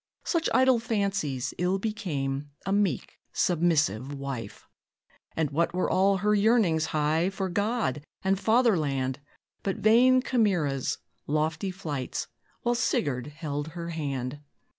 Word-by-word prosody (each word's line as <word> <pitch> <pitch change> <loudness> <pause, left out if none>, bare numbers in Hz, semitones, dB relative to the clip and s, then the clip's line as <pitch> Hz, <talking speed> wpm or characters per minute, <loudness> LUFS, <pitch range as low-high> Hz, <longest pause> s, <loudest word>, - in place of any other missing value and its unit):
Such 335 -2 0
idle 260 -2 +4
fancies 200 - -1
ill 180 +2 +2
became 145 -10 -3 0.2
A 195 - 0
meek, 200 -2 0
submissive 155 - +1
wife. 135 -6 -6 0.7
And 160 -3 0
what 170 +4 0
were 185 - +1
all 195 +1 +4
her 210 +2 +2
yearnings 205 -7 +3
high 155 +4 +1
For 195 -1 -3
God 205 - -1 0.2
and 190 0 +2
"Fatherland" 155 - +2 0.4
But 195 - -1
vain 250 +4 +5
chimeras, 175 - +1 0.3
lofty 155 +5 0
flights, 150 -8 -4 0.4
While 240 - +2
Sigurd 140 - 0
held 150 -1 -4
her 170 0 -4
hand? 140 -4 -3
170 Hz, 120 wpm, -27 LUFS, 145-205 Hz, 0.7 s, vain